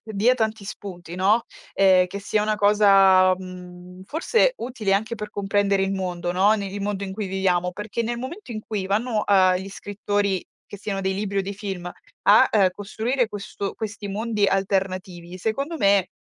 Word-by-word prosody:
dia 220 +3 +2
tanti 220 -3 -2
spunti, 180 -4 -8
no. 200 +6 +2 0.3
Ehm, 190 -2 +5
che 190 +2 -6
sia 210 +1 0
una 215 0 +1
cosa, 195 -3 +5
mhmm, 180 0 -11
forse 345 - +2
utile 235 -5 -2
anche 215 +4 0
per 210 -2 -7
comprendere 200 -1 +1
il 195 0 0
mondo, 180 -2 -3
no, 190 +4 +4
ne 200 -2 -3
il 200 +1 -6
mondo 200 -1 -2
in 190 - -6
cui 205 +1 -4
viviamo, 185 -2 0
perché 210 +4 -4
nel 235 +1 -3
momento 260 - -7
in 215 - -5
cui 210 -3 -4
vanno 215 +2 0
a 185 -2 +4
gli 190 +2 -6
scrittori, 205 -1 -2 0.2
che - - -9
siano 195 0 -3
dei 190 0 -1
libri 200 0 -2
o - - +1
dei 200 +1 -5
film 190 -3 -5 0.3
a - - +6 0.2
costruire 220 +5 -2
questo 200 -1 -5
questi 215 -1 -6
mondi 210 0 0
alternativi, 185 -2 -2
secondo 275 - -2
me 200 - +3
200 Hz, 180 wpm, -23 LUFS, 190-215 Hz, 0.3 s, a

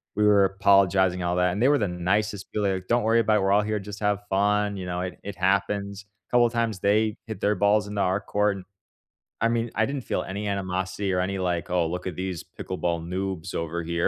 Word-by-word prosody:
we 105 - +1
were 100 -2 +6
apologizing 95 -1 +3
and 90 - -1
all 90 - 0
that, 90 0 +2
and 100 - -3
they 130 - +5
were 145 - +4
the 105 -6 0
nicest 95 +3 -1
people, 105 -2 0
like, 95 -1 -2
"Don't 120 -1 +2
worry 115 +1 +3
about 110 -2 +3
it, - - +1
we're 95 - +2
all 105 - +5
here, 105 0 -1
just 105 +1 -8
have 105 -1 0
fun, 105 +1 +1
you 95 -2 -6
know, 90 0 -2
it 90 0 -5
it 100 -1 -6
happens." 100 +1 0 0.2
A - - -35
couple 120 -1 +5
of 115 - -8
times 115 -4 -1
they 105 +3 +2
hit 110 -3 -6
their 105 - +3
balls 105 +2 +2
into 100 -1 -2
our 95 +2 +1
court, 105 0 0
and 95 - -10 0.8
I 115 - +4
mean, 115 0 -1
I 110 - +3
didn't 140 +2 -3
feel - - -2
any 100 +2 -4
animosity 95 0 -2
or 90 - +1
any, 95 +1 -2
like, 90 -2 -1
"Oh, 90 -2 +1
look 90 +2 -4
at 90 - -4
these 95 -3 -4
pickleball 85 -2 -4
noobs 95 -1 -4
over 85 +1 -3
here," 85 +1 0
100 Hz, 245 wpm, -25 LUFS, 90-105 Hz, 0.8 s, were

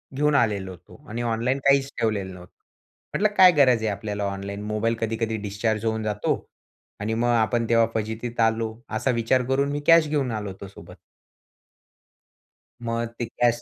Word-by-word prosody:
घेऊन 150 +1 +2
आलेलो 105 -7 +1
होतो 90 - -15
आणि 115 +3 -4
ऑनलाईन 120 +3 0
काहीच 140 0 +4
ठेवलेलं 100 -4 -1
नव्हतं. 90 -1 -13 0.6
म्हंटलं 210 0 +1
काय 185 -1 +9
गरज 130 -7 +4
आहे - - 0
आपल्याला 105 0 -4
ऑनलाईन 100 +1 -5
मोबाईल 110 +2 0
कधी-कधी 115 0 -2
डिस्चार्ज 110 +2 -1
होऊन 110 0 -1
जातो. 105 -1 0 0.6
आणि 105 +2 -2
मग 115 +2 0
आपण 120 0 +2
तेव्हा 115 -1 +5
फजितीत 110 +2 -4
आलो. 115 0 +1
असा 120 +4 0
विचार 120 +2 +1
करून 135 +2 +1
मी 145 - -2
कॅश 165 -2 +7
घेऊन 140 -4 0
आलो 105 -2 -4
होतो 95 +1 -9
सोबत. 100 - -13 1.9
मग 115 0 -2
ते 120 - -1
कॅश 120 0 0
115 Hz, 165 wpm, -24 LUFS, 105-125 Hz, 1.9 s, काय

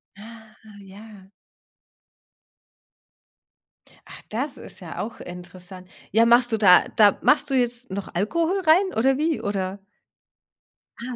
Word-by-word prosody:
Ah, 220 +1 -14 0.3
ja. 200 0 -15 2.8
Ach, - - -12
das 260 +6 -4
ist - - -11
ja 175 -3 -9
auch 230 - -6
interessant. 180 +1 -11 0.2
Ja, 225 +3 +4
machst 240 +1 +4
du - - +2
da 190 -4 +5
da 205 -2 +4
machst 295 -1 +2
du 270 - -1
jetzt 245 -3 -1
noch 200 0 -5
Alkohol 335 - -1
rein 370 +5 +3
oder 265 +3 +2
wie, 310 -5 -1
oder? 200 -2 -4 1.2
Ah. 250 0 -6
220 Hz, 125 wpm, -23 LUFS, 195-255 Hz, 2.8 s, da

